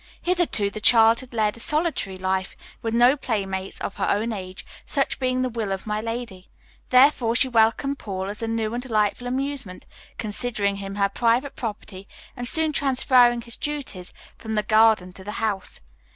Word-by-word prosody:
Hitherto 345 - +1
the 215 - -7
child 225 0 +6
had 260 - -11
led 215 -3 0
a - - -12
solitary 300 - -1
life, 190 0 -2 0.3
with 225 0 -2
no 245 +3 +6
playmates 195 -7 -3
of - - -4
her - - 0
own 220 +3 0
age, 185 -2 -7 0.2
such 275 -2 -1
being 255 -1 0
the 255 - 0
will 225 -4 -3
of 190 0 -3
my 210 0 -2
lady; 225 -5 -6 0.4
therefore 250 -3 +4
she 265 - +4
welcomed 240 +4 +2
Paul 190 -2 -4
as 210 +3 -6
a 225 - -2
new 225 -1 -1
and 240 - -2
delightful 225 -1 0
amusement, 260 -7 -4 0.3
considering 210 -2 -1
him 195 0 -6
her 200 -1 +2
private 235 +6 0
property 205 -4 -6 0.3
and 245 0 -4
soon 315 +3 +1
transferring 255 -3 +3
his 235 0 -8
duties 280 -12 -5 0.3
from 220 -1 -4
the 210 - +1
garden 215 -4 +3
to 190 - -12
the 210 +2 -6
house. 205 -4 -3
225 Hz, 180 wpm, -24 LUFS, 200-250 Hz, 0.4 s, child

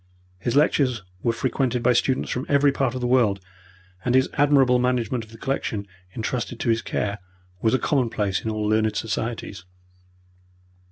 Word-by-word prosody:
His 120 +6 -2
lectures 135 -6 +2 0.2
were 115 - +2
frequented 125 0 -1
by 125 - +4
students 130 +2 +1
from 125 - -3
every 140 0 +4
part 135 -2 -1
of 130 - -4
the - - -1
world, 120 -6 +3 0.6
and 125 - +1
his 130 0 +4
admirable 135 -3 +4
management 125 -1 0
of 110 - -15
the 115 - -13
collection 115 -5 -2 0.3
intrusted 120 +1 -3
to 120 - 0
his 115 0 +2
care 105 0 -2 0.4
was 110 +2 +3
a - - +3
commonplace 115 -9 0
in 110 - -2
all 110 -1 -2
learned 110 0 +2
societies. 110 -3 -3
120 Hz, 165 wpm, -24 LUFS, 110-130 Hz, 0.6 s, by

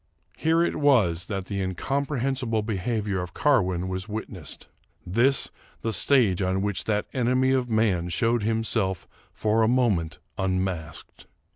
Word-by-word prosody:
Here 165 +1 +2
it - - -1
was 105 - +3
that 95 -3 -3
the 100 +1 -3
incomprehensible 130 - -1
behavior 105 -2 -2
of 90 - -7
Car 145 -4 +4
win 90 -1 -2
was 95 +2 -4
witnessed; 105 -5 -6 0.4
this 120 +9 +2 0.3
the 115 - -1
stage 105 -3 +4
on 95 +1 0
which 105 -2 -1
that 105 -1 0
enemy 130 +1 +2
of 130 -2 +1
man 105 -6 +1
showed 115 +6 +1
himself 110 -4 0 0.2
for 110 +1 +1
a 110 - +4
moment 110 -10 +1 0.2
unmasked. 95 -3 -3
110 Hz, 140 wpm, -25 LUFS, 95-125 Hz, 0.4 s, Car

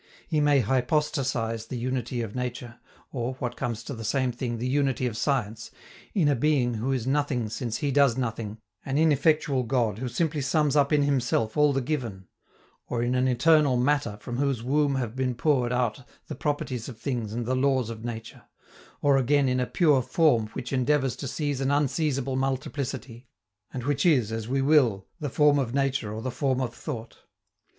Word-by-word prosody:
He 155 -3 +1
may 145 -2 +4
hypostasize 125 -2 0
the 125 - -5
unity 125 -1 -2
of 105 -2 -6
nature, 125 -1 -5 0.3
or, 125 0 -3
what 125 -2 -4
comes 120 -3 -3
to 140 - -6
the 115 -2 -7
same 130 +3 0
thing, 120 -1 -4
the 120 +2 -2
unity 135 -1 +1
of 120 -3 -2
science, 115 -4 -1 0.5
in 175 -7 +3
a 145 - +4
being 130 -2 +2
who 115 +4 -2
is 130 -4 -1
nothing 135 -4 0
since 115 0 -3
he 145 - -1
does 140 -3 +4
nothing, 115 -4 -3 0.3
an 135 +1 -2
ineffectual 150 -2 +3
God 115 -4 0
who 125 0 -3
simply 155 +4 -1
sums 145 +1 +1
up 145 -1 +3
in 150 -1 +4
himself 125 -5 0
all 150 -1 +4
the 135 -1 0
given; 120 -9 -3 0.6
or 120 -1 -1
in 120 +1 0
an 130 0 +2
eternal 145 +1 +4
Matter 125 -4 +1
from 120 +3 -5
whose 135 -4 0
womb 140 +2 +2
have 120 -3 -3
been 130 -1 -1
poured 125 -3 +1
out 125 -1 0 0.2
the - - -6
properties 135 -4 -3
of 120 - -9
things 120 -6 -3
and 120 +1 -3
the 130 - 0
laws 130 -3 +1
of 110 -1 -8
nature; 115 -2 -7 0.6
or, 140 -1 +5
again, 140 +1 +3
in 125 0 +1
a 125 - 0
pure 150 -7 +3
Form 120 -5 +2
which 125 - -5
endeavors 135 0 +1
to 140 - -5
seize 145 0 -2
an 135 - +1
unseizable 140 -2 0
multiplicity, 130 -2 -3 0.4
and 125 - -5
which 140 +1 0
is, 125 -10 +3
as 115 -1 -4
we 135 +2 0
will, 130 -10 +3
the 150 -3 -3
form 145 +1 +4
of 130 -1 -2
nature 135 -6 0
or 110 +1 -5
the 130 - -2
form 130 0 0
of 125 -3 -2
thought. 115 -2 -7
130 Hz, 190 wpm, -26 LUFS, 120-140 Hz, 0.6 s, or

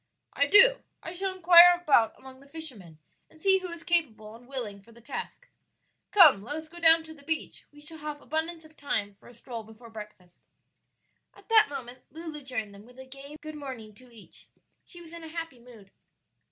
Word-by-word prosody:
"I 285 - +1
do; 480 +9 +7 0.2
I 330 - -6
shall 380 +2 -1
inquire 355 -1 +7
about 280 -10 +2
among 260 0 -14
the 280 - -19
fishermen 250 - -6 0.3
and 315 - -20
see 385 +2 +4
who 370 - -7
is 340 -1 -9
capable 245 -12 -1
and 240 +1 -17
willing 235 -7 -5
for 230 - -20
the 235 - -17
task. 235 - -8 0.6
Come, 320 - +6
let 245 +8 -6
us 315 0 -7
go 345 +2 -13
down 325 -1 +6
to 320 0 -10
the 295 - -17
beach; 315 +2 -5
we 295 0 -17
shall 320 +1 -7
have 300 -1 -6
abundance 320 +2 -4
of 315 0 -19
time 205 -9 -3
for 195 - -21
a 240 - -15
stroll 235 0 -8
before 220 +2 -15
breakfast." 210 -5 -12 1.0
At - - -20
that 440 -1 +5
moment 255 -3 -8
Lulu 315 0 -8
joined 235 -6 -5
them 200 +3 -15
with 250 +1 -19
a 260 - -11
gay 275 +2 -12
good 310 -1 -8
morning 260 -8 -9
to 250 +4 -19
each; 225 -3 -15 0.4
she 350 - -10
was 335 -1 -14
in 335 -1 -10
a - - -8
happy 325 -5 -7
mood. 230 -5 -17
285 Hz, 205 wpm, -27 LUFS, 235-330 Hz, 1.0 s, do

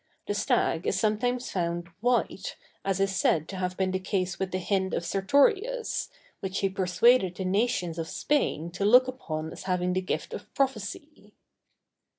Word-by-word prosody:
The - - -1
stag 170 -4 +1
is 185 - +1
sometimes 245 +4 0
found 170 -1 -2
white, 245 +3 0 0.3
as 195 -1 0
is 195 0 +1
said 160 -4 +2
to 195 - -5
have 185 0 -2
been 190 -1 +1
the 185 - -1
case 185 -1 -2
with 190 - -1
the 185 - -2
hind 190 0 0
of 170 - -2
Sertorius, 400 - +1 0.3
which 190 0 -3
he 195 - +2
persuaded 190 +2 +3
the 190 - -4
nations 185 -4 0
of 165 - -3
Spain 170 - 0
to 185 +3 -4
look 250 +5 +6
upon 160 -11 -4
as - - -9
having 180 -1 0
the 185 - +1
gift 185 - -3
of - - -8
prophecy. 270 +3 -3
190 Hz, 170 wpm, -28 LUFS, 180-240 Hz, 0.3 s, look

